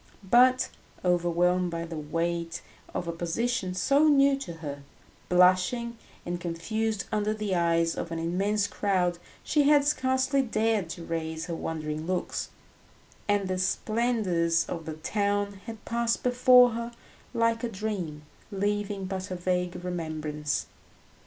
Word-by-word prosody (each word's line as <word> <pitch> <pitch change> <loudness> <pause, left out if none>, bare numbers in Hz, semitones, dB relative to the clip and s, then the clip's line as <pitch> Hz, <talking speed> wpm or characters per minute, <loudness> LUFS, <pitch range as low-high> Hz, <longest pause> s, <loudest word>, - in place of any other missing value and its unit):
But, 250 +4 +5 0.4
overwhelmed 180 +1 +2
by 170 0 -4
the 165 0 -7
weight 170 +2 -2 0.3
of 175 - -4
a - - 0
position 185 +4 -2
so 280 +11 +4
new 280 -2 +5
to 270 -11 -6
her, 145 -4 -7 0.5
blushing 185 +7 +3 0.3
and 175 0 -3
confused 210 +6 -2
under 215 0 0
the 210 -2 -2
eyes 170 -1 +2
of 170 - -5
an 165 - -3
immense 195 +5 0
crowd, 185 -4 0 0.2
she 295 -2 +3
had 290 -1 +5
scarcely 260 -1 +2
dared 220 -6 0
to 170 0 -7
raise 160 -1 -3
her 175 - -4
wondering 155 -1 -4
looks, 185 -1 -2 0.8
and 205 -2 +1
the 185 0 -1
splendours 185 -5 +1
of 165 -2 -5
the 160 - -5
town 200 +3 -1
had 225 -2 -8
passed 235 0 0
before 250 0 +6
her 235 +1 -4 0.4
like 230 0 +1
a 240 - -1
dream, 190 -8 -4 0.3
leaving 205 0 -1
but 190 0 -4
a 185 - -3
vague 180 0 -2
remembrance. 155 -4 -3
185 Hz, 140 wpm, -28 LUFS, 170-225 Hz, 0.8 s, before